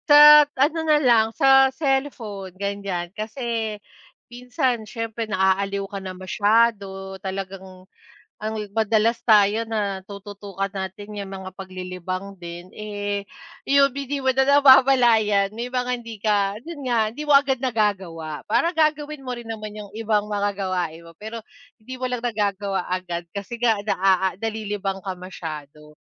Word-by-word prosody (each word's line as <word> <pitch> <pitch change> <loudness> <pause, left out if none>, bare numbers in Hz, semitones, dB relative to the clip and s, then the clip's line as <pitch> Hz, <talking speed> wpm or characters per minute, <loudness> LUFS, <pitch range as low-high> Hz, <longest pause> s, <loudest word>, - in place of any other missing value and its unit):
Sa 295 0 +10
ano 295 +5 +2
na 310 -1 +3
lang 235 -6 +4
sa 270 0 +6
cellphone 265 - -2
gan'yan, 200 -3 -4
kasi 220 0 -3 0.5
minsan 250 0 -1
siyempre 230 0 -4
naaaliw 195 +1 +1
ka 195 0 -6
na 185 -1 -7
masyado 195 -1 0
talagang 190 -1 -7 0.5
ang 215 +1 -4 0.2
madalas 225 +1 +2
tayo 215 0 +4
na 205 -4 -3
tututukan 200 -1 -6
natin 200 +2 -6
yung 200 -1 -6
mga 190 0 -7
paglilibang 185 0 -6
din, 175 0 -9
eh, 205 -1 -4 0.4
yung 280 0 +5
hindi 280 0 -3
mo 265 - -1
na 265 +1 +3
namamlayan, 255 -7 +5
may 245 +2 -5
mga 250 -1 -1
hindi 230 -2 -9
ka 205 -1 +1
yun 300 +1 -8
nga, 235 -4 +1
hindi 300 +6 -6
mo 295 - +2
agad 280 -1 +5
nagagawa, 185 - -2
para 320 +11 +1
gagawin 305 -2 0
mo 255 - -4
rin 240 -2 -8
naman 215 -2 -6
yung 205 - -9
ibang 210 -2 0
mga 205 -1 0
gawain 185 -4 -3
mo 165 - -13
pero 220 +4 -7 0.4
hindi 255 +4 -8
mo 255 - -5
lang 250 -1 -3
nagagawa 200 -4 -1
agad 175 -2 -3
kasi 200 +4 -6
nga 230 -3 +2
na, 210 - 0
ah, 190 0 +4
ah, - - -15
nalilibang 205 -2 -3
ka 190 -1 -5
masyado. 150 -4 -9
210 Hz, 150 wpm, -23 LUFS, 195-245 Hz, 0.5 s, Sa